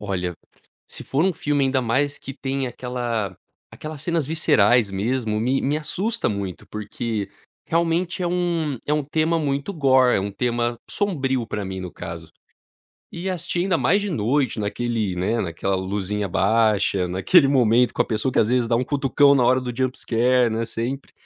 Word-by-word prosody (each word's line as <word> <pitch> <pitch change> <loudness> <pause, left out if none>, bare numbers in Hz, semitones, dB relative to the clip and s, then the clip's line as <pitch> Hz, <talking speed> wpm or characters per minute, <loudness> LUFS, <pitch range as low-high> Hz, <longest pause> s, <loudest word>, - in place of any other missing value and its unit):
Olha, 90 -2 -3 0.5
se - - -7
for 145 +5 0
um 190 -2 +2
filme, 145 -2 0
ainda 130 0 +1
mais, 140 +5 0
que 135 - -8
tem 135 0 -3
aquela 120 -6 -3 0.3
aquelas 155 -2 -7
cenas 165 -3 0
viscerais 120 -8 +3
mesmo, 110 +2 -1
me 130 +4 +1
me 145 +3 0
assusta 205 +9 -2
muito, 100 -3 -5
porque, 105 -1 -4 0.4
realmente, 170 +2 0
é - - +1
um 170 -6 -1
é 150 - +1
um 150 -1 0
tema 160 +3 0
muito 140 +4 -2
gore, 130 -5 +4
é - - 0
um 100 +1 -3
tema 120 +2 -1
sombrio 135 - -1
para 105 -2 -3
mim, 95 0 -5
no 90 -1 -6
caso. 85 -2 -8 0.8
E 175 +3 -4
assisti, 175 0 -2
ainda 180 -2 +1
mais 200 +4 +2
de 205 - -3
noite, 130 -2 0
naquele, 110 -2 -2
né, 105 +6 0
naquela 95 +2 -2
luzinha 100 +2 -2
baixa, 100 -2 +2
naquele 135 - +4
momento 125 -2 +3
com - - +3
a - - -10
pessoa 110 +3 0
que, - - 0
às 110 - +4
vezes, 125 -2 +1
dá 115 - +2
um 125 - 0
cutucão 140 0 +3
na 130 - +3
hora 130 +2 +4
do 125 -1 -4
jump 130 -1 -1
scare, 125 +1 +2
né, 115 +1 -1
sempre 120 +4 -4
125 Hz, 180 wpm, -23 LUFS, 105-145 Hz, 0.8 s, gore